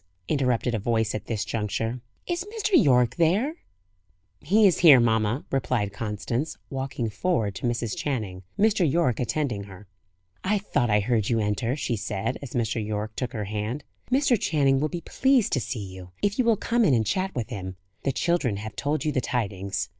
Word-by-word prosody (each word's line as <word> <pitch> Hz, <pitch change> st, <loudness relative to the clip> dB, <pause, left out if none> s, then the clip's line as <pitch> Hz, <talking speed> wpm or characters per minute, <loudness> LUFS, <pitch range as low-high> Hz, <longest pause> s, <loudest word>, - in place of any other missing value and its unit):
interrupted 125 Hz, -4 st, +1 dB
a 110 Hz, -, 0 dB
voice 110 Hz, 0 st, 0 dB
at 105 Hz, -, -5 dB
this 110 Hz, -3 st, -2 dB
juncture. 115 Hz, +3 st, -2 dB, 0.2 s
"Is 350 Hz, 0 st, -2 dB
Mr. 420 Hz, 0 st, -3 dB
Yorke 125 Hz, -, +4 dB
there?" 205 Hz, -, +2 dB, 0.8 s
"He 205 Hz, +8 st, +4 dB
is 185 Hz, -, +4 dB
here, 150 Hz, -7 st, +9 dB
mamma," 110 Hz, +2 st, +1 dB
replied 120 Hz, -6 st, 0 dB
Constance, 115 Hz, +7 st, -3 dB
walking 135 Hz, -3 st, -3 dB
forward 110 Hz, -, 0 dB
to 120 Hz, -, -3 dB
Mrs. 120 Hz, -2 st, -1 dB
Channing, 105 Hz, -10 st, -3 dB, 0.2 s
Mr. 200 Hz, -7 st, +3 dB
Yorke 160 Hz, -7 st, +1 dB
attending 125 Hz, -5 st, -1 dB
her. 100 Hz, 0 st, -12 dB, 0.6 s
"I 205 Hz, +3 st, +2 dB
thought 150 Hz, -, 0 dB
I 105 Hz, 0 st, +4 dB
heard 110 Hz, -1 st, +1 dB
you 115 Hz, -, +2 dB
enter," 110 Hz, +4 st, 0 dB
she 125 Hz, -5 st, -1 dB
said, 105 Hz, +3 st, -3 dB
as 140 Hz, -4 st, -8 dB
Mr. 115 Hz, -2 st, -1 dB
Yorke 105 Hz, 0 st, -3 dB
took 125 Hz, -2 st, -3 dB
her 105 Hz, -3 st, -3 dB
hand. 105 Hz, +7 st, -3 dB, 0.3 s
"Mr. 260 Hz, -3 st, +3 dB
Channing 135 Hz, -4 st, +2 dB
will 155 Hz, +2 st, 0 dB
be 175 Hz, +1 st, -5 dB
pleased 265 Hz, -, +2 dB
to 130 Hz, -, +3 dB
see 115 Hz, -4 st, -4 dB
you, 90 Hz, -1 st, -10 dB
if 205 Hz, +4 st, 0 dB
you 250 Hz, -, +3 dB
will 230 Hz, -2 st, +4 dB
come 235 Hz, +3 st, +1 dB
in 145 Hz, -, +4 dB
and 110 Hz, -2 st, +1 dB
chat 190 Hz, -, -1 dB
with 120 Hz, 0 st, -3 dB
him. 95 Hz, -5 st, -5 dB, 0.3 s
The 135 Hz, -, +1 dB
children 140 Hz, -, 0 dB
have 105 Hz, 0 st, -7 dB
told 150 Hz, +6 st, -1 dB
you 155 Hz, -, +2 dB
the 130 Hz, -, 0 dB
tidings. 100 Hz, -6 st, -2 dB
125 Hz, 190 wpm, -26 LUFS, 105-160 Hz, 0.8 s, here